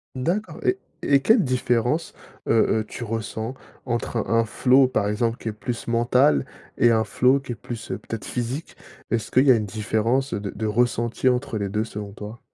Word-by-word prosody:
D'accord. 175 +12 -2
Et 375 - +2 0.3
et 140 - +4
quelle 220 - +4
différence, 125 +3 0 0.4
heu - - +4 0.3
heu, - - -1
tu 110 - -8
ressens 110 +1 -4 0.3
entre 120 -1 -2
un 115 - -1
un 115 - +2
flow, 130 +3 +4
par 110 -5 0
exemple, 115 +3 0
qui - - -8
est - - -2
plus 115 +2 -5
mental 120 +5 +3 0.4
et 120 - +6
un 110 -1 +3
flow 125 +5 +3
qui 135 -2 -8
est - - -3
plus, 115 0 -8
peut-être 105 +3 -5
physique? 125 +6 -4 0.4
Est-ce 115 -2 -1
qu'il 130 +2 +4
y 135 - +7
a - - +7
une 105 -2 -1
différence 110 +6 0
de 100 0 -3
de 110 - -4
ressenti 120 +2 +1
entre 125 -2 -1
les 100 -1 -2
2 105 +3 -1
selon 105 -2 -7
toi? 105 +3 -9
120 Hz, 195 wpm, -24 LUFS, 110-130 Hz, 0.4 s, y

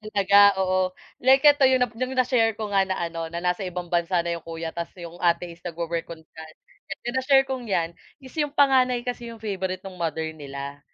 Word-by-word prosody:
talaga, 200 0 +2 0.3
oo. 185 0 0 0.2
Like 265 +2 +4
ito 290 -2 +6
yung 260 -1 +3
nap 245 - -3
yung 255 +3 -4
na-share 240 -4 +2
ko 215 -1 -5
nga 195 -1 +2
na 190 - -1
ano, 165 -2 -4
na 170 +2 -6
nasa 180 +2 -1
ibang 180 -1 -6
bansa 175 0 +1
na 170 - -2
yung - - -29
kuya 165 0 -5
ta's 170 0 -4
yung 175 -1 -10
ate 175 0 +1
is 170 - -14
nagwo-work 170 -1 -4
on 165 -1 -10
diyan. 160 0 -13 0.5
Sa 240 - -3
na-share 270 0 +4
kong 260 -3 -5
yan 170 -4 0 0.3
is 260 - -12
yung 295 -1 -1
panganay 255 -3 +3
kasi 245 -1 -5
yung 230 -1 -11
favourite 190 -2 -3
no'ng 185 -2 -10
mother 160 -1 -2
nila. 140 -2 -8
185 Hz, 215 wpm, -24 LUFS, 170-245 Hz, 0.5 s, ito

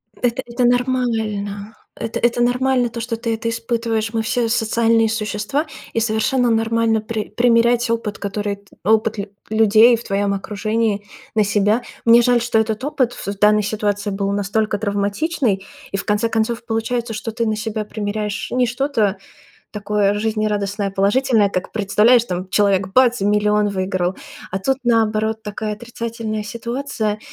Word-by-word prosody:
Это 245 +1 -1
это 240 +1 -1
нормально. 220 -5 -1 0.2
Это 230 +1 -4
это 240 0 +1
нормально 250 0 +2
то, 235 0 -6
что 230 0 -3
ты 230 0 -2
это 225 +1 -2
испытываешь. 230 -1 -2
Мы 225 - +1
все 230 +1 0
социальные 225 0 +2
существа, 215 +6 -2 0.3
и - - +1
совершенно 230 +3 +1
нормально 225 0 +1
при 215 0 -4
примерять 235 0 +3
опыт, 230 -2 -2
который 200 0 -3
т 200 0 -24
опыт 220 +2 +2
лю 200 0 -5 0.2
людей 220 +2 +6
в 230 - -7
твоем 200 0 0
окружении 210 +1 -1 0.3
на 215 - +4
себя. 210 +3 +2 0.2
Мне 235 +1 +7
жаль, 240 0 +3
что 235 -1 +1
этот 220 +1 -1
опыт 265 -4 0
в - - -9
в 200 0 -4
данной 210 0 +4
ситуации 205 0 -1
был 195 0 -1
настолько 205 +1 0
травматичный, 205 - -1 0.3
и 195 - -1
в - - -5
конце 210 +2 +1
концов 225 +1 -1
получается, 230 +1 -2
что 220 +1 -4
ты 230 +1 -1
на 215 - 0
себя 215 0 -3
примеряешь 210 -1 -3
не 250 0 +2
что-то 240 -5 0 0.5
такое 205 -1 0
жизнерадостное, 210 -2 -1
положительное, 205 +2 +2
как 185 -2 -3
представляешь, 220 +3 +4
там 185 -2 -4
человек, 195 -1 +2
бац, 245 +2 +3
и - - +1
миллион 210 0 +2
выиграл. 185 -2 -1 0.3
А 190 - -2
тут, 260 +8 0
наоборот, 220 -2 +1
такая 210 +1 -4
отрицательная 230 -1 -5
ситуация. 235 -1 -3
220 Hz, 160 wpm, -20 LUFS, 205-235 Hz, 0.5 s, Мне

